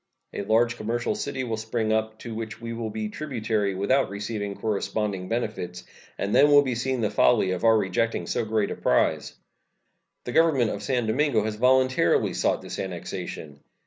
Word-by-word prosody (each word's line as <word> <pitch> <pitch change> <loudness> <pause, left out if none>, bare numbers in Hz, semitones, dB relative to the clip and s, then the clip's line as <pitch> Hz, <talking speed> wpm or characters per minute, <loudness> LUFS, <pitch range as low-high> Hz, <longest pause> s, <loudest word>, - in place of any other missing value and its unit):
A - - -3
large 115 +4 +2
commercial 120 - -1
city 140 -10 -3
will 115 -3 -3
spring 110 0 -1
up, 110 0 -1
to 115 - -6
which 110 -1 -6
we 115 0 -5
will 115 -1 -4
be 110 0 -3
tributary 110 -7 -2
without 130 +8 +2
receiving 100 0 -4
corresponding 100 -2 -2
benefits, 105 -6 -3 0.3
and 100 - -2
then 140 +4 +6
will 145 0 +7
be 130 -3 -1
seen 130 +1 -1
the 105 - 0
folly 105 -6 +3
of 90 - -3
our 115 -1 +6
rejecting 115 +3 0
so - - -1
great 110 -2 0
a - - -3
prize. 65 - +1 0.9
The 120 - -5
Government 140 -7 +3
of 100 - -5
San 120 +3 0
Domingo 115 0 +1
has 110 0 -2
voluntarily 130 -4 +3
sought - - 0
this - - -6
annexation. 80 -5 -6
110 Hz, 175 wpm, -25 LUFS, 105-125 Hz, 0.9 s, will